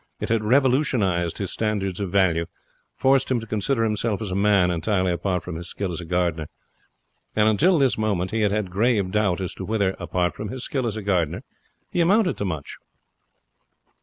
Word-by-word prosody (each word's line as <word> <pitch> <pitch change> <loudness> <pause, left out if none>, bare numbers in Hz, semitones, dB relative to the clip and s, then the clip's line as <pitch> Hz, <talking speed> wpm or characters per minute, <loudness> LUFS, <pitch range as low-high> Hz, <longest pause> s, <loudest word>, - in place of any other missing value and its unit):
It - - -4
had 115 -1 +1
revolutionized 120 - +2
his 100 -3 -3
standards 100 -4 -2
of 100 -2 -2
value 85 -4 +2 0.5
forced 135 0 +2
him 130 -2 +1
to 115 - -8
consider 115 +3 0
himself 105 -1 0
as 105 -4 -5
a - - -2
man, 100 -3 +3
entirely 90 +2 0
apart 90 +1 -1
from 90 -3 -6
his 85 +1 -6
skill 100 -3 -3
as 85 - -4
a - - -8
gardener. 85 -3 -1 0.9
And 105 0 +4
until 165 - +4
this 135 -6 +2
moment 100 -4 0
he 110 0 0
had 105 -2 +2
had 100 -3 -1
grave 100 -1 +1
doubt 105 -4 +1
as 90 - -4
to - - -7
whether, 100 -1 0
apart 90 -1 -1
from 105 - -6
his 130 +2 -6
skill 130 -4 -2
as 110 - -3
a 110 - -5
gardener, 90 - 0 0.5
he 175 - +1
amounted 190 +2 +3
to 100 - -2
much. 80 -6 -5
100 Hz, 195 wpm, -23 LUFS, 90-115 Hz, 0.9 s, And